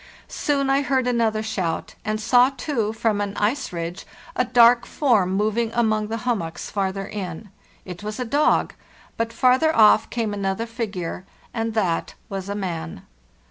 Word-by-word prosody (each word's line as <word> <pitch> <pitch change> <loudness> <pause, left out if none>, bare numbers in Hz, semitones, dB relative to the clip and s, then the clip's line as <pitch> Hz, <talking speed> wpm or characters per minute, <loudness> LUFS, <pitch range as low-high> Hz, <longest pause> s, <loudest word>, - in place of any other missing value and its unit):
Soon 280 -2 0
I 275 +1 +3
heard 265 -1 +1
another 230 -3 +1
shout, 185 -6 -3
and 215 0 -2
saw, 245 +3 +5
too, 265 -6 -2
from 220 -2 0
an 205 0 -3
ice 245 +7 0
ridge, 170 +1 -5 0.3
adark 245 -1 +5
form 215 -11 +2
moving 215 +3 +1
among 215 -2 +1
the 225 +1 -3
hummocks 175 -9 -2
farther 195 -1 -2
in. 195 -1 -6 0.4
It 180 0 -8
was 210 +3 -5
a 250 - -1
dog; 290 +6 +2 0.4
but 230 0 -2
farther 260 +7 +3
off 215 0 +6
came 225 -3 -2
another 200 +2 -2
figure, 210 -7 -5 0.3
and 225 -1 -2
that 180 -6 0
was 195 -1 -5
a 200 - -2
man. 170 - -5
220 Hz, 155 wpm, -23 LUFS, 195-240 Hz, 0.4 s, off